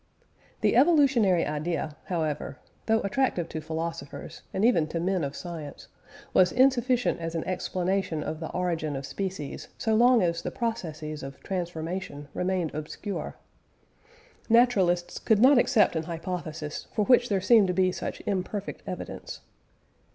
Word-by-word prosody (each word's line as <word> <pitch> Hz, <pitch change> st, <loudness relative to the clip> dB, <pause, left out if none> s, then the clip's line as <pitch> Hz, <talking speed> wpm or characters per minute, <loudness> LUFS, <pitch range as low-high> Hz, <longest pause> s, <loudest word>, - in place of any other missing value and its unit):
The -, -, +3 dB
evolutionary 260 Hz, -, +4 dB
idea, 150 Hz, 0 st, -2 dB
however, 160 Hz, -5 st, -2 dB, 0.3 s
though 225 Hz, 0 st, +3 dB
attractive 200 Hz, -4 st, 0 dB
to 160 Hz, -, -5 dB
philosophers, 160 Hz, -2 st, -5 dB
and 195 Hz, -, +1 dB
even 170 Hz, -11 st, +4 dB
to 165 Hz, -, -3 dB
men 185 Hz, 0 st, 0 dB
of 140 Hz, 0 st, -3 dB
science, 160 Hz, -5 st, -8 dB, 0.4 s
was 185 Hz, -, +5 dB
insufficient 255 Hz, -3 st, +3 dB
as 165 Hz, 0 st, -4 dB
an 165 Hz, -, -1 dB
explanation 185 Hz, -2 st, -1 dB
of 155 Hz, 0 st, -4 dB
the 160 Hz, -, -5 dB
origin 165 Hz, -5 st, -2 dB
of 135 Hz, 0 st, -4 dB
species 185 Hz, -5 st, -5 dB
so 220 Hz, -, 0 dB
long 240 Hz, 0 st, +5 dB
as 170 Hz, -1 st, 0 dB
the -, -, -3 dB
processes 155 Hz, -, -4 dB
of 135 Hz, 0 st, -8 dB
transformation 175 Hz, -4 st, -4 dB
remained 180 Hz, -3 st, -1 dB
obscure. 155 Hz, +7 st, -5 dB, 1.1 s
Naturalists 195 Hz, -7 st, +3 dB
could 220 Hz, -, +3 dB
not 255 Hz, +4 st, +7 dB
accept 215 Hz, -7 st, +3 dB
an 160 Hz, 0 st, -1 dB
hypothesis 165 Hz, -2 st, -5 dB
for 210 Hz, -3 st, +2 dB
which 245 Hz, 0 st, +5 dB
there 200 Hz, -2 st, +2 dB
seemed 205 Hz, +1 st, +5 dB
to 180 Hz, -, 0 dB
be 185 Hz, 0 st, +3 dB
such -, -, -5 dB
imperfect 200 Hz, 0 st, -3 dB
evidence. -, -, -6 dB
180 Hz, 145 wpm, -27 LUFS, 160-215 Hz, 1.1 s, not